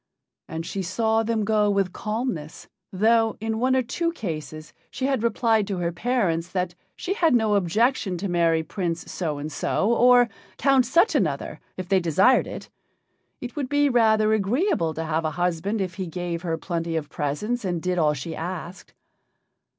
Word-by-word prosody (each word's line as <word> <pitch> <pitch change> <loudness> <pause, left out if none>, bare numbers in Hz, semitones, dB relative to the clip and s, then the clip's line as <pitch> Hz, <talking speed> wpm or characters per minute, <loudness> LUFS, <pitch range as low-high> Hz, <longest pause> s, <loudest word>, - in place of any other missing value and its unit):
And 160 +1 -5
she 195 - -3
saw 220 +5 +1
them 225 -1 -1
go 210 -1 +2
with 195 -2 0
calmness, 215 - -4 0.2
though, 225 +3 +2
in 220 +1 -2
one 260 +2 +2
or 260 - +2
two 335 +8 -1
cases 155 - -6 0.2
she 260 - -3
had 270 -4 +1
replied 225 -2 +2
to 195 -3 -2
her 170 -1 -1
parents 175 -4 0
that 180 -2 -2 0.2
she 375 - -3
had 330 - +3
no 220 -3 +2
objection 200 +1 +1
to 195 +4 -3
marry 165 -2 +2
Prince 170 0 -4
So 155 -5 -3
and 150 +2 -5
so, 205 +8 0
or 245 0 +6 0.3
Count 270 -3 +3
Such 345 +7 +4
another, - - -1 0.2
if 185 -1 -5
they 190 0 +3
desired 190 - +3
it - - -7 0.7
it 245 -1 -7
would 280 -4 -3
be 290 0 +3
rather 220 -3 +3
agreeable 215 - +1
to 160 - -3
have 160 +1 -1
a 155 - 0
husband 180 +4 -1
if 185 -3 -2
he 190 -1 -5
gave 170 0 -4
her 165 -2 -2
plenty 165 -1 -3
of 155 -2 -2
presents 210 - -2
and 175 -3 -1
did 180 +1 -1
all 150 -2 +3
she 160 +4 -5
asked. 175 +1 -7
195 Hz, 180 wpm, -24 LUFS, 170-235 Hz, 0.7 s, or